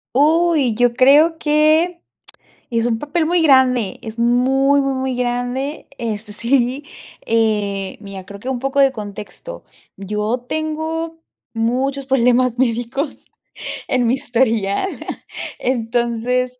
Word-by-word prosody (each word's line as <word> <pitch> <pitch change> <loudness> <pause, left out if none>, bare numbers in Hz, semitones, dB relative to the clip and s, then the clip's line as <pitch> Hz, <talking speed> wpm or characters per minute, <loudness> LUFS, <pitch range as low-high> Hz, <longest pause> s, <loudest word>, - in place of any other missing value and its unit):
Uy, 310 -3 +3
yo 245 +1 +3
creo 290 +6 +5
que 310 +3 +2 0.7
es 230 -1 +1
un 225 -2 0
papel 315 +4 -1
muy 345 +2 +2
grande, 255 -8 +3
es 225 -1 -8
muy, 265 +4 +3
muy, 275 0 0
muy, 260 -1 -2
grande, 245 +4 -2
este, 215 -2 -4
sí. 250 +4 0 0.4
Eh, 210 -4 0
mira, 195 -2 -9
creo 200 0 -10
que 250 - -7
un 260 -2 -1
poco 270 +2 0
de 270 -1 +5
contexto. 215 - -8 0.3
Yo 210 +4 -2
tengo 320 +1 -3 0.3
muchos 260 +4 -1
problemas 250 -1 +2
médicos 245 +4 -1 0.7
en 250 -1 +1
mi 240 - +3
historial 235 - 0 0.7
entonces. 245 +1 -1
250 Hz, 120 wpm, -19 LUFS, 230-280 Hz, 0.7 s, creo